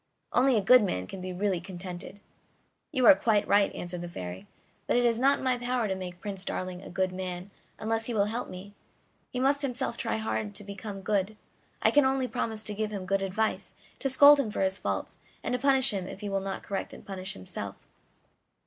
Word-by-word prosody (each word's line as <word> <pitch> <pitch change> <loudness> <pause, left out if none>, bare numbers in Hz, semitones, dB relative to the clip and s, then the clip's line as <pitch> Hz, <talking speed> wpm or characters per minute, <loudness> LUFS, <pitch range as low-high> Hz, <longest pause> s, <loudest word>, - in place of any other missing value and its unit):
Only 255 0 +4
a - - +3
good 250 +5 +8
man 90 - -1
can 190 - -8
be 185 0 -4
really 185 -1 0
contented." 180 +1 -5 0.7
"You 255 -1 +2
are - - +11
quite 205 +1 +2
right," 200 0 +4
answered 175 0 -4
the 175 - -5
Fairy; 90 - -7 0.4
"but - - +3
it 245 - +3
is 230 -1 +2
not 275 +2 +4
in - - -8
my 255 -2 +1
power 245 -2 0
to 195 - 0
make 180 -2 -6
Prince 195 -1 -5
Darling 185 -1 -4
a - - -9
good 185 +1 0
man 185 +1 -5 0.3
unless 225 +1 -1
he 240 - -2
will 200 -1 +3
help 230 +4 -3
me; 190 +3 -9 0.6
he 250 - -4
must 280 +2 +2
himself 255 -3 -1
try 230 -3 -1
hard 215 -1 -2
to 205 - -5
become 200 0 -7
good, 205 +1 0 0.5
I - - +5
can 290 - +5
only 265 -1 +1
promise 225 -3 -3
to 210 - -2
give 215 +1 -2
him 200 -3 -5
good 195 +1 +1
advice, 200 +3 -1 0.2
to 270 - 0
scold 285 +2 +8
him 255 -6 0
for 210 - -3
his 190 0 +1
faults, - - -3 0.2
and - - -1
to 250 - 0
punish 270 -1 +5
him 190 -3 -3
if 195 - -8
he 205 - -3
will 195 0 0
not 195 0 -4
correct 195 - -4
and - - -12
punish 190 -1 -5
himself." 95 - -7
205 Hz, 220 wpm, -29 LUFS, 190-245 Hz, 0.7 s, are